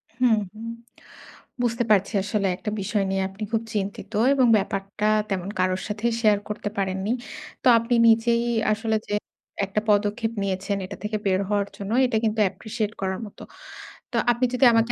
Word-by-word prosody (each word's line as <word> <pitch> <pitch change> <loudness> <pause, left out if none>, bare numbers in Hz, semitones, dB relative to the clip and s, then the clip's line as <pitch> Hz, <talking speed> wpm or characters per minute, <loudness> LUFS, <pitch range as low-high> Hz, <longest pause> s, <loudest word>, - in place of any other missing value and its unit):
হুম, 245 -2 +4 0.2
হু। 215 - -13 1.0
বুঝতে 240 0 +1
পারছি 200 +1 +3
আসলে 205 0 0
একটা 210 - -4
বিষয় 205 +1 0
নিয়ে 195 0 0
আপনি 195 +3 -8
খুব 225 0 +1
চিন্তিত 200 0 -3 0.2
এবং 260 -3 +4
ব্যাপারটা 195 +1 -3 0.2
তেমন 190 -1 -2
কারোর 185 0 +1
সাথেই 220 +3 -1
শেয়ার 210 -3 +4
করতে 210 0 -3
পারেননি। 190 +1 -1 0.5
তো - - +3
আপনি 230 +2 -1
নিজেই 235 +1 +4 0.3
আসলে 220 +1 0
যে - - -4 0.5
একটা 195 +2 -1
পদক্ষেপ 210 +2 +2
নিয়েছেন 195 +1 -1
এটা 195 - -8
থেকে 210 +1 -1
বের 190 -1 +2
হওয়ার 205 -1 +1
জন্য 200 +1 -5
এটা 245 -3 +1
কিন্তু 220 0 0
অ্যাপ্রিশিয়েট 215 +2 -3
করার 190 -1 -1
মতো। 205 - -13 0.7
তো - - -5 0.2
আপনি 240 +2 +1
যদি 255 +1 +4
আমাকে 230 +1 +3
210 Hz, 165 wpm, -24 LUFS, 195-225 Hz, 1.0 s, হুম